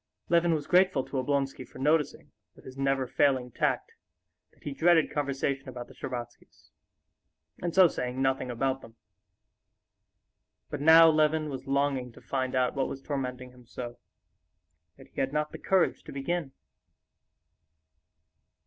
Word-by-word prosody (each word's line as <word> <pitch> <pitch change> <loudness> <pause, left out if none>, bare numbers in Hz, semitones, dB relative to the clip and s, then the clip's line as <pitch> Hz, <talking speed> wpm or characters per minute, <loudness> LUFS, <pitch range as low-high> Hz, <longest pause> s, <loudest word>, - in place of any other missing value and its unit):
Levin 170 -1 +3
was 150 -2 -4
grateful 180 -6 +3
to 135 - -6
Oblonsky 135 0 -1
for 125 - -15
noticing, 150 +2 0 0.2
with - - -18
his 130 - -10
never 135 -1 0
failing 130 -1 +1
tact, - - -1 0.6
that - - -27
he 145 - -4
dreaded 165 +3 +3
conversation 140 -1 -2
about 125 -1 -8
the - - -15
Shtcherbatskys, 120 -2 -8 0.9
and 175 -1 -3
so 190 -1 +8
saying 125 -4 -4
nothing 135 -1 0
about 130 +2 -1
them. 115 - -14 1.8
But 145 - -4
now 160 +2 +8
Levin 155 -1 +2
was 135 0 -7
longing 135 -2 0
to - - -14
find 130 -1 -3
out 125 -1 +2
what 135 -1 -1
was 135 - -6
tormenting 125 -3 -4
him 125 -1 -19
so, 120 -1 -7 1.0
yet - - -14
he - - -6
had 135 0 0
not 150 0 -1
the - - -8
courage 190 -2 +1
to - - -9
begin. 140 +1 -3
135 Hz, 150 wpm, -28 LUFS, 130-150 Hz, 1.8 s, so